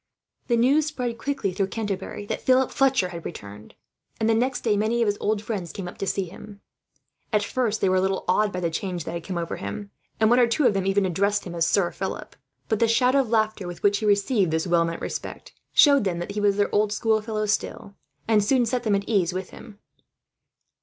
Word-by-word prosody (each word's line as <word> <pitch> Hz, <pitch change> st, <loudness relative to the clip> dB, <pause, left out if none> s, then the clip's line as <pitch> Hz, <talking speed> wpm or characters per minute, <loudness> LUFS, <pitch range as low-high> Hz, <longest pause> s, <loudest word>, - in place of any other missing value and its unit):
The 235 Hz, -, +2 dB
news 280 Hz, +6 st, +3 dB
spread 245 Hz, -6 st, -4 dB
quickly 275 Hz, -9 st, -2 dB
through 195 Hz, +1 st, 0 dB
Canterbury 205 Hz, -1 st, -4 dB
that -, -, -4 dB
Philip 260 Hz, 0 st, +3 dB
Fletcher 265 Hz, -9 st, +2 dB
had 170 Hz, -2 st, -8 dB
returned, 105 Hz, -9 st, -9 dB, 0.4 s
and 220 Hz, -, +1 dB
the 225 Hz, -, +4 dB
next 250 Hz, +4 st, 0 dB
day 215 Hz, -3 st, +1 dB
many 220 Hz, +3 st, +1 dB
of -, -, +1 dB
his 205 Hz, -1 st, 0 dB
old 210 Hz, 0 st, -1 dB
friends 200 Hz, -6 st, -4 dB
came 190 Hz, -3 st, -6 dB
up 180 Hz, -, -10 dB
to 195 Hz, -, -3 dB
see 195 Hz, +2 st, 0 dB
him. 200 Hz, +3 st, -12 dB, 0.7 s
At 210 Hz, -2 st, +2 dB
first 220 Hz, 0 st, -1 dB
they -, -, +3 dB
were 185 Hz, 0 st, +3 dB
a -, -, +3 dB
little 190 Hz, 0 st, -1 dB
awed 205 Hz, +3 st, +2 dB
by 180 Hz, -, -4 dB
the 170 Hz, -1 st, -1 dB
change 180 Hz, 0 st, -3 dB
that -, -, -5 dB
had 170 Hz, -1 st, -5 dB
come 180 Hz, 0 st, -4 dB
over 170 Hz, -1 st, -3 dB
him, 205 Hz, -1 st, -6 dB, 0.3 s
and 220 Hz, +1 st, +4 dB
one 245 Hz, -, +5 dB
or 245 Hz, -, +5 dB
two 245 Hz, +5 st, +1 dB
of 215 Hz, -, +5 dB
them 195 Hz, -1 st, -1 dB
even 195 Hz, 0 st, +2 dB
addressed 200 Hz, +3 st, 0 dB
him 175 Hz, -, -7 dB
as 165 Hz, -1 st, +1 dB
Sir 180 Hz, -2 st, +2 dB
Philip. -, -, -6 dB, 0.3 s
But 220 Hz, -, 0 dB
the 230 Hz, -, +4 dB
shout 250 Hz, +3 st, +3 dB
of 270 Hz, -4 st, +2 dB
laughter, 215 Hz, -4 st, 0 dB
with 175 Hz, -1 st, -8 dB
which 200 Hz, 0 st, +3 dB
he 215 Hz, -, -1 dB
received 205 Hz, -1 st, +2 dB
this 160 Hz, +2 st, 0 dB
well 170 Hz, -2 st, +3 dB
meant 165 Hz, 0 st, -5 dB
respect, -, -, -6 dB, 0.2 s
showed 280 Hz, -4 st, +6 dB
them 185 Hz, -3 st, -1 dB
that 175 Hz, +3 st, -5 dB
he 205 Hz, +1 st, -3 dB
was 205 Hz, -1 st, +2 dB
their 205 Hz, -, 0 dB
old 210 Hz, 0 st, +2 dB
schoolfellow 215 Hz, 0 st, 0 dB
still; 205 Hz, -1 st, -2 dB, 0.3 s
and 215 Hz, -2 st, +3 dB
soon 245 Hz, +3 st, +2 dB
set 245 Hz, +2 st, -1 dB
them 215 Hz, -4 st, +1 dB
at 200 Hz, 0 st, -2 dB
their 225 Hz, -, -1 dB
ease 180 Hz, -3 st, +2 dB
with 185 Hz, +1 st, -5 dB
him. 210 Hz, -3 st, -12 dB
205 Hz, 240 wpm, -24 LUFS, 185-230 Hz, 0.7 s, showed